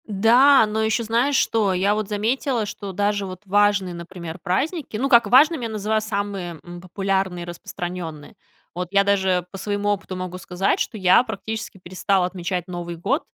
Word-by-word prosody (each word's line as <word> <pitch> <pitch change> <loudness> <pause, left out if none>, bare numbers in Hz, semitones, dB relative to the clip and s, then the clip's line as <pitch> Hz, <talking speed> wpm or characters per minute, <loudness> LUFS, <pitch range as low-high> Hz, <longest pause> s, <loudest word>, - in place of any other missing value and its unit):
Да, 230 +6 +5
но 215 +1 -2
ещё 220 +1 +1
знаешь, 235 +6 +1
что? 215 -6 +2
Я 195 +3 +2
вот 215 -1 -3
заметила, 230 +3 0
что 205 -1 -7
даже 205 +1 0
вот 185 -1 -8
важные, 200 -2 +2
например, 170 0 -8
праздники, 270 - -2
ну, 270 +5 -1
как 235 -3 +6
важным 295 +4 +5
я 230 - -3
называю 215 0 -1
самые, 200 -6 -4
м, 175 0 -10
популярные 190 -1 -2
и - - -7
распространённые. 175 -2 -7 0.4
Вот 180 +1 -4
я 200 0 +4
даже 190 -3 +1
по 195 - -7
своему 205 +1 -2
опыту 200 -2 -2
могу 185 0 -5
сказать, 185 +2 -1
что 220 - -2
я 185 +3 +5
практически 220 -2 -6
перестала 185 +1 0
отмечать 180 0 -3
Новый 175 -1 -5
год. 225 - -1
200 Hz, 175 wpm, -22 LUFS, 180-220 Hz, 0.4 s, как